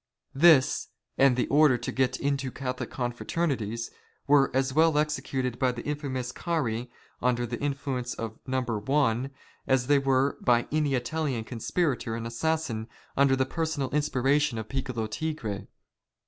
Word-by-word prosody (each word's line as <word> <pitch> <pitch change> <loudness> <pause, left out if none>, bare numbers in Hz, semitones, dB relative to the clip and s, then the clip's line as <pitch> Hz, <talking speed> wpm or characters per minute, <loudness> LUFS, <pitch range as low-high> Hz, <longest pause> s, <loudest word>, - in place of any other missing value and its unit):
This, 145 -2 +5 0.3
and 135 -2 +5
the 125 - +2
order 145 -3 +5
to 120 - -4
get 130 -1 0
into 140 -1 -1
Catholic 125 -2 -4
confraternities, 120 -2 -2 0.3
were 140 -1 +5
as 135 0 0
well 160 0 +4
executed 135 -5 -1
by 130 -2 +3
the 120 -1 -7
infamous 135 -4 -3
Carey 125 -8 -2 0.3
under 120 -1 +1
the 120 0 -5
influence 135 -3 -2
of 110 -1 -6
" - - -32
No. 130 0 0
One," 120 +2 0 0.4
as 130 -2 +2
they 145 +2 +4
were 135 0 +1
by 120 -1 +3
any 150 -2 +1
Italian 130 -1 -2
conspirator 120 +1 -1
and 115 0 -5
assassin^ 120 -2 -1 0.3
under 140 -1 +4
the 130 0 +1
personal 155 -2 -2
inspiration 145 -2 +1
of 110 -1 -5
Piccolo 130 -4 -2
Tigre. 110 - -4
130 Hz, 145 wpm, -28 LUFS, 120-145 Hz, 0.4 s, This